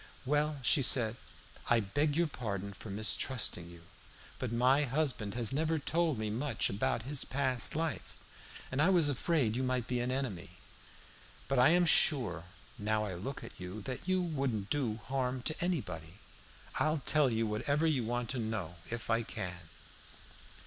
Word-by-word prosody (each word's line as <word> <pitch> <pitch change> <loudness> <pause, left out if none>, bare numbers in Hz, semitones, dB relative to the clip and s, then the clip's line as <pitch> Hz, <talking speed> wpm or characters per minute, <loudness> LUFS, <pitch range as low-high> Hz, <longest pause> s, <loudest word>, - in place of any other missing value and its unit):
"Well," 150 +2 +1
said 120 -4 +4
she, - - -21
"I - - +4
beg 145 +9 0
your 170 - +3
pardon 100 - -4
for 100 +2 -10
mistrusting 105 -3 -1
you, 85 -1 -13 0.6
but 125 -3 -3
my 130 +5 +3
husband 130 -7 -1
has 120 -1 +2
never 160 +3 +1
told 160 -1 0
me 110 -1 -3
much 120 +1 -1
about 105 +3 -1
his 140 +2 0
past 130 -2 0
life, 160 -1 -3 0.5
and 130 +2 0
I 165 - +4
was 170 -6 +4
afraid 140 -4 +1
you 130 - -1
might 130 -2 -1
be 125 0 -2
an 120 +1 -1
enemy. 130 -9 -4 0.9
But 135 -1 +1
I 125 - +7
am 175 +1 +4
sure, 120 - +6 0.3
now 105 +1 0
I 100 - -4
look 105 +11 -6
at - - -10
you, 90 +3 -7
that 130 - -6
you 185 -1 +2
wouldn't 135 - -2
do 130 -7 0
harm 130 -1 -2
to 155 +4 -2
anybody. 100 - -3 0.6
I'll 155 -1 +1
tell 150 -2 +3
you 115 -1 0
whatever 140 +9 0
you 145 -6 +1
want 120 +1 -2
to 130 - -3
know, 105 -7 -4
if 115 0 -4
I 115 0 +2
can." 90 -6 -6
125 Hz, 170 wpm, -32 LUFS, 110-145 Hz, 0.9 s, I